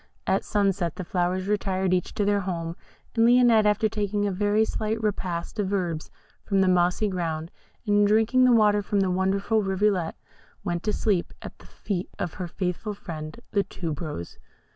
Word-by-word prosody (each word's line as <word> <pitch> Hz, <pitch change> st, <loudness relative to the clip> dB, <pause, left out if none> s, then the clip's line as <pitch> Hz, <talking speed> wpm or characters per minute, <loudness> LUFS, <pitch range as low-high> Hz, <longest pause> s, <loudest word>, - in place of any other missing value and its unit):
At -, -, +1 dB
sunset 195 Hz, -5 st, 0 dB
the 185 Hz, -, -5 dB
flowers 180 Hz, +1 st, -1 dB
retired 190 Hz, -3 st, 0 dB
each 180 Hz, -1 st, -1 dB
to 205 Hz, -, +1 dB
their 205 Hz, 0 st, +2 dB
home; 170 Hz, -3 st, -3 dB, 0.4 s
and 225 Hz, -, +3 dB
Lionette, 235 Hz, -2 st, +5 dB
after 210 Hz, +1 st, +3 dB
taking 205 Hz, -1 st, -1 dB
a 200 Hz, -, 0 dB
very 205 Hz, +3 st, +2 dB
slight 220 Hz, 0 st, -2 dB
repast 185 Hz, -3 st, -3 dB
of 195 Hz, -2 st, 0 dB
herbs 175 Hz, -5 st, -2 dB, 0.3 s
from 195 Hz, -2 st, +1 dB
the 190 Hz, -, +3 dB
mossy 180 Hz, +3 st, +3 dB
ground, 165 Hz, -4 st, -3 dB, 0.3 s
and 205 Hz, -1 st, +4 dB
drinking 225 Hz, +4 st, +4 dB
the 250 Hz, -, +5 dB
water 210 Hz, -3 st, +4 dB
from 200 Hz, 0 st, 0 dB
the 190 Hz, -1 st, +1 dB
wonderful 195 Hz, +4 st, +1 dB
rivulet, 195 Hz, -3 st, 0 dB, 0.5 s
went 175 Hz, -1 st, -2 dB
to 210 Hz, -, +2 dB
sleep 200 Hz, -6 st, 0 dB
at -, -, -9 dB
the -, -, -16 dB
feet 190 Hz, -3 st, -4 dB
of 170 Hz, -, -3 dB
her 180 Hz, -, -2 dB
faithful 185 Hz, +4 st, -3 dB
friend 155 Hz, +1 st, -7 dB
the 200 Hz, -, +3 dB
Tube 170 Hz, -5 st, -5 dB
rose. 150 Hz, -, -6 dB
195 Hz, 180 wpm, -26 LUFS, 180-210 Hz, 0.5 s, Lionette